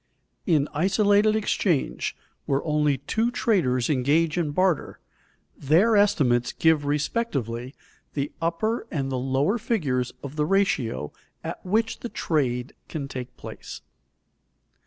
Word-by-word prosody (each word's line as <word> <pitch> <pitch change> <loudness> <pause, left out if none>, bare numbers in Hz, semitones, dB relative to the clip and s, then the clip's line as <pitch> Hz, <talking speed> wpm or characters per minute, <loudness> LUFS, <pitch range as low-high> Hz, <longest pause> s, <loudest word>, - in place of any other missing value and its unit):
_In 155 -6 +3
isolated 205 +5 +3
exchange, 195 -7 0 0.3
where 135 0 +1
only 150 -2 +2
two 220 - 0
traders 140 - +1
engage 150 +4 +2
in 170 -4 0
barter, 180 +2 0 0.6
their 175 +11 +3
estimates 140 -13 +3
give 160 -3 +3
respectively 140 - -2 0.4
the 140 0 -2
upper 215 +8 -1
and 135 -4 -2
the 130 - -1
lower 135 - +1
figures 150 - 0
of 140 +2 -7
the 150 - +2
ratio 135 - 0 0.3
at - - -6
which 220 +4 0
the 240 - -5
trade 130 - -1 0.2
can 145 -4 -4
take 125 -2 -7
place. - - -9
150 Hz, 120 wpm, -25 LUFS, 135-200 Hz, 0.6 s, In